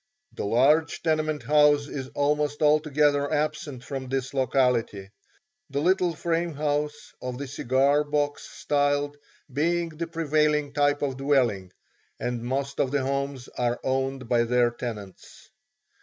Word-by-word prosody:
The - - -4
large 145 +9 +3
tenement 155 -3 0
house 145 +1 +4
is 135 -3 -5
almost 150 +1 0
altogether 150 -1 +3
absent 150 -4 -2
from 135 -2 -6
this 135 0 -2
locality, 125 -7 0 0.6
the 140 - -2
little 180 +1 +2
frame 170 0 -1
house 150 0 -2
of 125 -1 -4
the 140 +1 -5
cigar 135 +3 +2
box 145 0 -2
style 145 0 0 0.4
being 170 +4 +1
the 165 +1 -5
prevailing 150 -3 +1
type 145 0 +2
of 135 -2 -2
dwelling, 125 -10 +1 0.5
and 120 -1 -3
most 135 +3 -3
of 135 - +2
the 140 0 0
homes 140 -1 -3
are 120 -1 -1
owned 135 -1 -1
by 120 -1 +2
their 120 0 +2
tenants. 110 -5 -8
145 Hz, 135 wpm, -26 LUFS, 130-150 Hz, 0.6 s, house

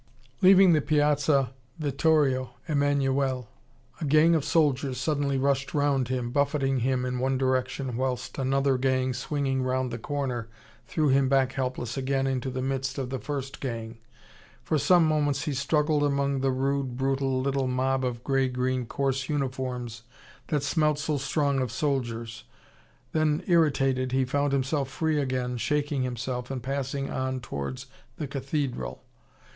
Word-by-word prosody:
Leaving 190 -1 +7
the 155 - +3
Piazza 145 -3 +2 0.2
Vittorio 145 -4 +1
Emmanuele 140 -4 +1 0.5
a 165 - -3
gang 155 +3 +5
of 160 -4 +2
soldiers 140 -3 +1
suddenly 145 -3 0
rushed 135 +1 0
round 140 -3 +2
him, 125 -1 -2
buffeting 140 -1 +1
him 125 +1 0
in 125 0 -2
one 130 +1 +1
direction, 130 -1 -1
whilst 130 +1 -2
another 135 0 +1
gang, 130 0 +1
swinging 135 +1 -1
round 130 0 -1
the 120 - -4
corner, 125 -4 -3 0.4
threw 155 -3 +1
him 135 0 +3
back 135 -1 +3
helpless 125 -3 -3
again 135 0 0
into 130 -1 -1
the 130 0 -3
midst 135 0 -2
of 130 -2 -3
the 130 - -2
first 140 -1 -5
gang. 115 -3 -5 0.6
For 155 - +1
some 170 +4 +5
moments 145 -2 +1
he 150 - -2
struggled 150 +2 +1
among 140 -1 +1
the 135 +1 +1
rude, 135 -1 -1
brutal 135 0 0
little 135 0 0
mob 130 +1 0
of 120 -1 -3
grey 135 -1 +1
green 125 -1 -1
coarse 135 -1 -1
uniforms 130 -5 -3 0.5
that 145 -3 0
smelt 150 0 +2
so 150 0 -1
strong 140 0 0
of 125 -3 -2
soldiers. 115 -5 -2 0.7
Then, 155 +1 +1
irritated, 135 -7 +2
he 130 0 +2
found 140 +2 0
himself 140 0 0
free 155 +1 0
again, 125 -2 -2
shaking 145 +2 0
himself 125 0 -3
and 130 -3 -4
passing 135 +1 -3
on 130 0 -2
towards 70 - -5 0.3
the 150 - -3
cathedral. 135 - -3
135 Hz, 150 wpm, -27 LUFS, 130-145 Hz, 0.7 s, Leaving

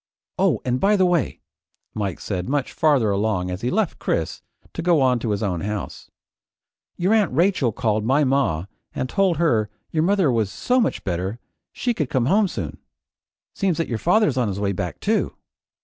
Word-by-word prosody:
"Oh - - +2
an' 125 0 0
by 205 +6 +3
the 190 -2 +3
way," 175 -5 0 0.5
Mike 100 -4 -3
said 90 +1 -4
much 140 -1 -1
farther 140 -9 +3
along 100 -3 0
as 90 +2 -5
he 120 - 0
left 215 +3 0
Chris - - -2 0.3
to - - -4
go 170 -2 +3
on 130 -2 +3
to 115 - -3
his 105 0 -1
own 90 -5 -1
house, 105 0 -5 0.9
"your 185 +5 +2
Aunt 210 -6 +3
Rachel 160 - +2
called 110 0 0
my 135 +6 +3
ma 130 - +1 0.3
and 130 - -2
told 185 +3 +1
her 115 -11 +2 0.2
your 155 - +1
mother 185 -4 +3
was 110 -4 +1
so 250 0 +1
much - - -1
better 95 +3 -2 0.3
she 245 - -1
could 155 - -2
come 125 -3 +1
home 200 - +3
soon. - - -5 0.7
Seems 190 -4 0
that 165 - -1
your 115 -3 -2
father's 210 - +3
on 125 -3 +2
his 100 -1 -3
way 100 -1 0
back 95 - -4
too." - - 0
130 Hz, 190 wpm, -22 LUFS, 105-175 Hz, 0.9 s, by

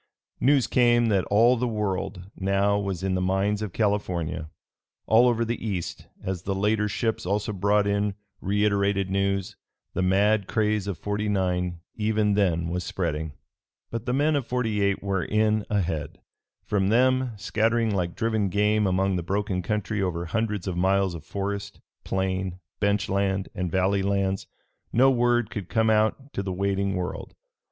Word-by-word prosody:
News 135 -1 +4
came 120 -2 +3
that 100 -3 +2
all 115 +5 +4
the 125 +2 0
World 100 -3 -3
now 100 +1 +1
was 95 -3 -3
in 95 -1 0
the 90 - 0
mines 95 +3 +1
of 105 -3 -3
California. 90 -6 -1 0.6
All 115 +3 +5
over 115 -1 +2
the 120 +1 -3
East, 95 -6 -4 0.2
as 95 -2 -3
the 95 +2 -2
later 105 +2 +1
ships 110 +2 -1
also 105 +3 -1
brought 100 +2 +2
in 100 0 0 0.3
reiterated 100 -1 +1
news, 100 -1 -1 0.4
the 95 - -1
mad 100 +2 +3
craze 105 -2 0
of 100 -4 -3
'49 95 -4 -1
even 105 -1 +1
then 85 -5 +1
was 90 +2 -2
spreading. 80 -4 -3 0.6
But 115 +1 -5
the 125 - +1
men 145 +3 +2
of 140 -4 -1
'48 105 -6 0
were 95 -3 0
in 110 +1 +1
ahead. 85 -8 -2 0.5
From 100 -2 +1
them, 130 +2 +3
scattering 115 +2 +1
like 90 -3 -1
driven 110 -3 0
game 105 +1 +2
among 95 0 +1
the - - -1
broken 100 +1 -1
country 105 +2 -2
over 85 -2 -1
hundreds 105 0 -2
of 95 - -2
miles 95 +1 +2
of 80 -3 -8
forest, 100 +1 -4 0.2
plain, 95 -1 -2 0.2
bench 100 -1 +1
land 100 0 0
and 90 -1 -2
valley 95 +3 +1
lands, 95 -1 0 0.4
no 130 +3 +5
word 120 -2 +2
could 100 -4 -5
come 110 -1 +2
out 110 +6 +1
to - - -2
the 95 -1 -3
waiting 100 +1 0
world. 90 0 -5
100 Hz, 160 wpm, -26 LUFS, 95-110 Hz, 0.6 s, All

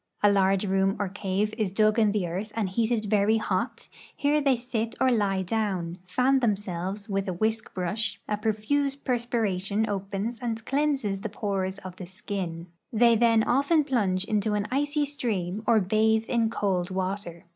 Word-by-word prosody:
A 205 - +6
large 195 0 +3
room 195 0 +2
or 200 -2 -2
cave 200 +2 -1
is 205 -4 0
dug 215 +2 +3
in 215 -2 +4
the 200 -3 0
earth 190 +6 -4
and 215 -4 0
heated 225 +2 0
very 210 +1 +3
hot; 225 +3 -2 0.3
here 295 +1 +2
they 275 -2 +3
sit 235 -2 -3
or 260 - +4
lie 200 -5 +1
doAvn; 185 -4 -2
fan 255 +8 +3
themselves 200 -3 -2
Avith 195 -2 -2
a 185 - -1
Avhisk 220 +4 -1
brush; 200 +3 -2
a 210 - 0
profuse 220 +7 0
perspiration 220 -6 -1
opens 200 +3 -3
and 225 -2 -4
cleanses 270 -9 0
the 220 - -3
pores 195 -2 -2
of 185 -2 -9
the 180 - -7
skin; 185 -3 -5 0.3
they 235 +1 +5
then 225 -1 +4
often 280 +6 +3
plunge 200 -9 0
into 210 0 0
an 205 0 0
icy 290 +2 +1
stream 215 -9 -2
or 225 -2 +5
bathe 220 +3 +2
in 230 -2 +1
cold 190 -5 0
Avater. 185 -2 -4
210 Hz, 170 wpm, -27 LUFS, 195-230 Hz, 0.3 s, A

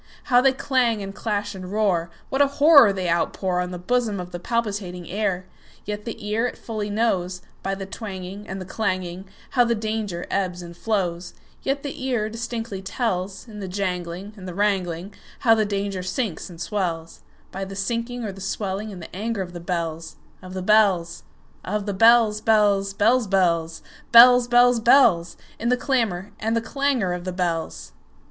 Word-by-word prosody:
How 245 -3 +4
they 270 +1 +5
clang, 255 -5 +1
and 195 0 -6
clash, 205 -1 -2
and 185 -1 -8
roar! 195 -6 +1 0.2
What 270 - +1
a 285 - +6
horror 285 -7 +8
they 190 -2 -3
outpourOn 180 +1 0
the 180 - -5
bosom 220 +1 0
of 180 0 -7
the 175 - -5
palpitating 200 -6 -3
air! 195 -2 -1 0.4
Yet 210 0 -5
the 220 -3 -6
ear 225 +3 +1
it - - -7
fully 215 -2 -4
knows, 190 -4 0 0.2
By 195 - -2
the 195 0 -6
twangingAnd 195 -1 -7
the 185 - -6
clanging, 185 -2 -3 0.3
How 245 - +4
the 235 -1 +1
danger 215 -5 -3
ebbs 180 -2 -1
and 170 0 -10
flows; 175 -4 -2 0.3
Yet 275 +1 -1
the 280 -2 -6
ear 240 -5 0
distinctly 230 -3 -5
tells, 190 -1 -3
In 210 -2 -9
the 195 - -5
janglingAnd 185 +1 -4
the 180 - -6
wrangling, 190 -2 -1 0.3
How 225 - +6
the 220 -1 +2
danger 200 -2 -2
sinks 185 0 -3
and 170 -2 -12
swells,—By 175 0 -5
the 195 0 -7
sinking 235 +5 -2
or 210 - -3
the 195 0 -11
swelling 195 +1 -3
in 190 -4 -8
the 165 - -10
anger 215 0 -2
of 175 -1 -10
the 175 - -6
bells, 165 -2 -4 0.3
Of 185 0 -9
the 185 - -3
bells, 190 -5 +3 0.4
Of 205 +1 -2
the 205 - -2
bells, 225 0 +5
bells, 205 -3 +3
bells, 230 +3 +3
bells, 170 -4 +1 0.3
Bells, 245 +1 +8
bells, 245 0 +5
bells—In 225 -2 +3
the 250 - +3
clamor 225 -8 -1
and 225 +1 0
the - - +1
clangor 260 -7 0
of 180 0 -5
the 185 - -3
bells! 170 -3 -3
200 Hz, 175 wpm, -23 LUFS, 180-225 Hz, 0.4 s, horror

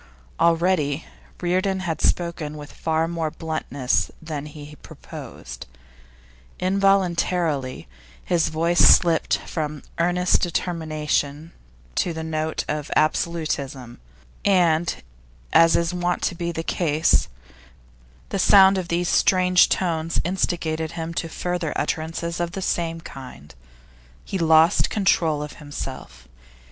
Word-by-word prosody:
Already 165 -3 +2 0.4
Reardon 185 +2 0
had 165 -4 -3
spoken 165 -3 -1
with 145 0 -9
far 160 0 0
more 165 -2 -2
bluntness 150 -5 -2
than 150 -2 -6
he 150 0 -11
proposed; - - -10 0.9
involuntarily, 180 - +1 0.4
his 175 -2 +1
voice 165 +2 0
slipped 170 -2 +5
from 150 -2 -4 0.2
earnest 180 +1 +2
determination 155 -3 -2 0.4
to 170 - 0
the 160 0 -5
note 160 0 -2
of 150 -1 -3
absolutism, 150 -6 -1 0.4
and, 175 - +2 0.5
as 165 0 +6
is 170 +1 0
wont 175 0 -1
to - - 0
be 170 0 -3
the 165 -1 -4
case, 160 -2 +1 1.0
the - - -2
sound 195 -1 +6
of 180 - -5
these 175 +1 0
strange 180 -1 +4
tones 165 -2 0
instigated 165 -3 -2
him 165 0 -5
to 165 0 -3
further 175 -1 -3
utterances 165 +2 -2
of 170 0 -2
the 195 - -4
same 165 -2 -1
kind. 125 - -11 0.7
He 195 - -3
lost 160 0 +4
control 165 -7 +1
of 150 - -9
himself. 145 - -8
165 Hz, 115 wpm, -23 LUFS, 155-175 Hz, 1.0 s, as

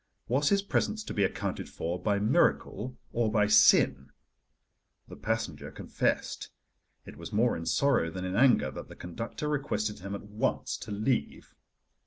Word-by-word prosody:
Was 140 +5 +2
his 200 -1 +2
presence 215 +2 -1
to - - -6
be 100 - +1
accounted 95 - -2
for 85 +2 -4
by 100 +1 +1
miracle 105 +3 +1 0.2
or 115 -2 +1
by 105 -1 +3
sin? 105 -10 +5 1.0
The - - -10
passenger 115 +1 -3
confessed. - - -2 0.6
It - - -11
was - - -8
more 115 +3 +2
in 80 - -6
sorrow 140 -12 +2
than 90 +2 -5
in 95 +1 -3
anger 120 - +4
that - - -8
the - - -12
conductor 115 - -5
requested 110 -8 -2
him 100 +2 -5
at - - -7
once 105 +1 -2
to 105 - -8
leave. 110 +5 -2
105 Hz, 160 wpm, -29 LUFS, 100-125 Hz, 1.0 s, sin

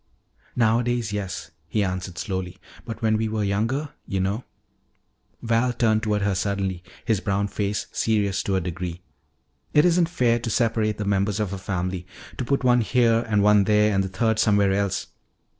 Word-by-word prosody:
"Nowadays, 120 -1 +1
yes," 100 -3 -4 0.2
he 105 - 0
answered 90 -1 -4
slowly. 95 -2 -4 0.3
"But 115 -1 -7
when 110 -1 +3
we 110 0 -1
were 110 -1 -1
younger 115 +9 -1 0.2
You 95 - -1
know," 100 +6 -1 1.0
Val 115 +2 +2
turned 110 -2 +2
toward 105 -2 0
her 100 -1 +1
suddenly, 95 -1 -1 0.2
his 110 -4 +2
brown 100 +1 0
face 100 0 -2
serious 100 -4 +1
to 100 - 0
a 95 - +1
degree, 90 0 -5 0.7
"it 150 +2 +6
isn't 175 -1 +3
fair 120 -8 +2
to 115 - -4
separate 110 -2 +1
the 105 - -3
members 100 +1 +1
of 100 -3 -1
a 100 - -4
family. 90 -1 -3 0.3
To - - 0
put 135 +2 0
one 125 -1 +4
here 115 0 +3
and 105 -2 +3
one 105 -1 +5
there 105 0 +3
and 95 0 +2
the 95 - -4
third 110 +3 0
somewhere 100 -2 +3
else. 100 -1 0
105 Hz, 175 wpm, -24 LUFS, 95-115 Hz, 1.0 s, it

